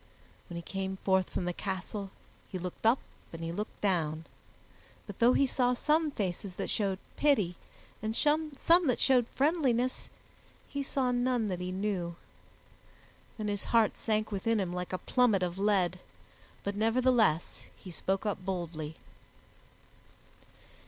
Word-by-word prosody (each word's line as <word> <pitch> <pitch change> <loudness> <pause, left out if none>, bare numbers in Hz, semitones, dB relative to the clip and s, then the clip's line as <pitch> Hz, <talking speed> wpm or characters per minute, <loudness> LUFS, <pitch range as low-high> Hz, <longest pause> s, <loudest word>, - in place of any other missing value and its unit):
When 175 - -6
he 170 - -5
came 190 +1 -3
forth 190 -1 +3
from 180 - -2
the 180 - -1
castle 195 +2 -4 0.4
he 190 - -4
looked 180 +4 -3
up 235 +4 +6 0.3
and 165 0 -7
he 165 - -2
looked 210 +5 -5
down, 165 -5 0 0.8
but 205 - -9
though 240 +2 +6
he 275 - +4
saw 250 -1 +2
some 305 +4 +2
faces 195 -6 -3
that - - -2
showed 195 -3 0 0.2
pity 215 -12 +3 0.5
and 220 +1 -2
some 305 +2 +2 0.4
that 250 - +2
showed 250 -3 +4
friendliness, 265 -5 +1 0.6
he 280 - -3
saw 270 -2 0
none 245 -3 +1
that 180 -2 -2
he 180 0 -3
knew. 185 -3 -2 1.2
Then 215 -2 -3
his 205 -1 -2
heart 230 -2 +3
sank 215 -1 -1
within 215 +3 +1
him 180 -3 -1
like 180 0 -4
a 185 - -1
plummet 220 -3 +2
of 180 +1 -2
lead, 190 -3 +2 0.6
but 200 - -2
nevertheless 225 -5 +2
he 185 - -10
spoke 190 +4 -1
up 205 -3 -2
boldly. 170 -5 -4
205 Hz, 145 wpm, -31 LUFS, 180-245 Hz, 1.2 s, up